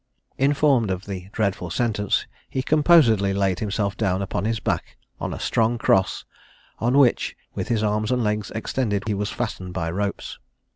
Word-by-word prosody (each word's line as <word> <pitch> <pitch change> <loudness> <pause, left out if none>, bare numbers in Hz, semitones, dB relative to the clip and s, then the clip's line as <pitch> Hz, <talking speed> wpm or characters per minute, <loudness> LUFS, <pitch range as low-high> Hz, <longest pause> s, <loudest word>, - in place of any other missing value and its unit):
Informed 140 -4 +3
of 95 0 -3
the 95 -2 -6
dreadful 100 -5 -1
sentence, 105 0 0 0.2
he 130 - -2
composedly 130 - +4
laid 95 -2 +1
himself 100 -2 -1
down 100 -3 0
upon 95 0 -3
his 110 0 0
back - - -3 0.2
on - - -3
a - - -5
strong 115 +1 +1
cross, 95 -4 +1 0.5
on 120 +4 +2
which, 135 -4 +3 0.2
with - - -4
his 110 -2 0
arms 105 +1 0
and 125 -1 +1
legs 105 -1 -1
extended, 110 -3 -1
he 110 - 0
was 100 +1 -2
fastened 95 -8 -4
by 85 -3 -2
ropes. 100 +3 -3
105 Hz, 165 wpm, -23 LUFS, 95-120 Hz, 0.5 s, composedly